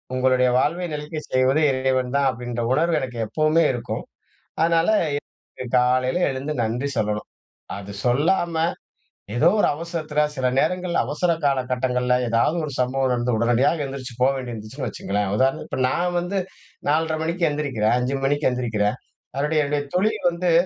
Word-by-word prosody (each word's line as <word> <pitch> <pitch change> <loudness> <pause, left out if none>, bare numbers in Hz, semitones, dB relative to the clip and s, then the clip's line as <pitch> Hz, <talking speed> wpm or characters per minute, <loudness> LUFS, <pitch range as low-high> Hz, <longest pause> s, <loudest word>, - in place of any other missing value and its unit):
உங்களுடைய 130 -1 +3
வாழ்வை 170 +6 0
நிலைக்கச் 150 +1 -6
செய்வது 130 +4 +3
இறைவன் 130 -1 0
தான் 140 -1 +3
அப்டின்ற 120 -1 -4
உணர்வு 165 +2 +2
எனக்கு 125 -2 -5
எப்பவுமே 155 +4 +2
இருக்கும். 120 - -4 0.6
அதனால 165 +1 +3 0.9
காலையில 130 +5 +2
எழுந்து 135 +3 -3
நன்றி 120 +5 -1
சொல்லணும். 105 0 -1 0.5
அது 100 0 -8
சொல்லாம 165 +7 +2 0.8
ஏதோ 155 +7 +5
1 - - +4
அவசரத்தில 155 -2 -3
சில 130 -2 -1
நேரங்கள்ள 180 +3 0
அவசர 170 +5 +1
காலகட்டங்கள்ல 125 -2 +1
ஏதாவது 115 +8 +2
1 145 - -5
சம்பவம் 130 +1 +1
நடந்து 120 -1 0
உடனடியாக 120 +7 +2
எழுந்திரிச்சு 135 -2 -6
போ 130 - +5
வேண்டியது 125 -2 -5
இருந்துச்சுன்னு 115 +4 -6
வச்சுங்களேன், 100 0 -2
உதாரணத்துக்கு 135 +2 0
இப்ப - - +1
நான் 175 +3 0
வந்து 190 +3 -2 0.5
4:30 160 +1 +1
மணிக்கு 170 +1 0
எந்திரிக்கிறேன் 135 -7 0
5 125 +2 -1
மணிக்கு 145 +1 +2
எந்திரிக்கிறேன். 115 -3 0 0.4
அதனுடைய 150 +2 +1
என்னுடைய 145 0 -1
தொழில் 215 0 +1
வந்து 170 +1 -1
135 Hz, 140 wpm, -23 LUFS, 125-160 Hz, 0.9 s, ஏதோ